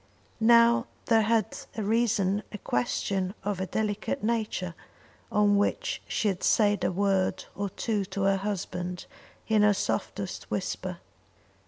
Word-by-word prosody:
Now 235 +1 +5 0.2
there 225 -1 +4
had 220 -1 +1 0.2
arisen 210 -2 +1
a 210 - -5
question 185 - -1
of 200 -2 -2
a 190 - -2
delicate 215 +6 -2
nature 215 -6 -1 0.6
on 205 -1 +4
which - - 0
she 220 - 0
had 190 -3 -1
said 205 -2 +3
a - - +2
word 195 0 +1
or 200 0 -3
two 210 0 -1
to 195 +1 -3
her 195 0 +3
husband 180 -2 -4 0.4
in 220 -1 +3
her 210 -1 +5
softest - - -3
whisper. - - -3
205 Hz, 135 wpm, -28 LUFS, 190-220 Hz, 0.6 s, Now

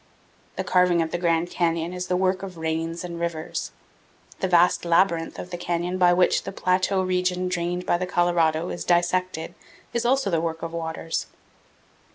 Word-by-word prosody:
The - - -2
carving 180 -2 +3
of 160 - -5
the 175 - -2
Grand 170 0 +1
Canyon 170 0 0
is 180 0 -4
the 180 - +1
work 185 0 +1
of 190 -3 -7
rains 165 +1 -2
and 170 -1 -6
rivers. 170 -2 -3 0.7
The 190 - 0
vast 175 0 +4
labyrinth 170 -1 +2
of 180 - -7
canyon 175 +1 -2
by 180 -1 +6
which 180 0 +3
the - - -6
plateau 185 0 +1
region 180 0 0
drained 180 0 -2
by 175 - +1
the 185 - -2
Colorado 175 -2 +1
is - - -4
dissected 175 -1 0 0.4
is 235 - 0
also 250 -4 +2
the 165 -2 +1
work 165 -1 -3
of 165 0 -4
waters. 165 0 -3
175 Hz, 175 wpm, -24 LUFS, 165-180 Hz, 0.7 s, by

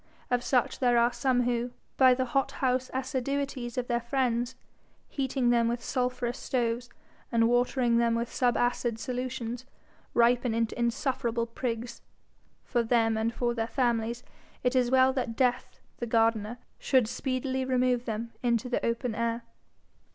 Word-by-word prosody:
Of 245 0 +2
such 250 -2 +1
there 245 -2 +3
are 235 +1 +3
some 245 0 +1
who, 240 0 -1 0.2
by 260 -1 +6
the 260 0 0
hot 270 +2 0
house 255 -1 0
assiduities 260 -1 -2
of 250 - 0
their 240 -1 0
friends, 245 0 0 0.5
heating 265 -3 0
them 235 -1 +3
with 235 +1 -2
sulphurous 250 -1 -1
stoves, 240 -1 -1 0.4
and 230 -1 +4
watering 245 0 +2
them 235 -1 +2
with 235 +1 -1
subacid 245 -2 +1
solutions, 250 -1 -4 0.5
ripen 240 0 +3
into 230 0 0
insufferable 235 -1 0
prigs. 235 0 -4 0.6
For 240 - 0
them 225 -1 +2
and 220 +1 0
for 240 0 -1
their 225 -1 -2
families 235 -2 0 0.4
it 250 +1 +1
is 250 -1 +3
well 260 0 +5
that 245 -4 -2
Death 250 -1 0 0.2
the 240 - -4
gardener 225 0 +1 0.2
should 255 -5 +3
speedily 260 +2 -2
remove 250 -1 +1
them 230 +1 -4
into 240 0 +1
the 245 - -1
open 235 0 -1
air. 230 +1 -1
245 Hz, 150 wpm, -29 LUFS, 235-255 Hz, 0.6 s, by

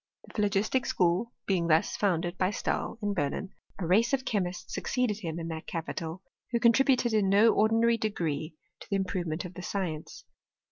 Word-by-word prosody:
The - - -16
phlogistic 210 +4 +1
School 180 +7 +1
being 180 -4 +1
thus 160 0 +3
founded 175 -3 0
by 185 0 +1
Stahl, 205 - -2
in 205 0 0
Berlin, 180 +3 -2 0.2
a 185 - -3
race 220 +9 +3
of 265 -1 +1
chemists 185 -6 -2
succeeded 245 -5 -1
him 165 -5 -4
in 165 -1 -4
that 160 -1 -6
Capital, 165 +1 -4 0.3
who 235 - 0
contributed 240 0 +4
in 205 -3 +3
no 210 +3 +6
ordinary 225 +2 +3
degree 160 -7 -2 0.2
to - - -13
the 200 - 0
improvement 185 -3 -2
of 180 - -8
the 180 - -8
science. 175 -5 -4
195 Hz, 175 wpm, -29 LUFS, 170-220 Hz, 0.3 s, no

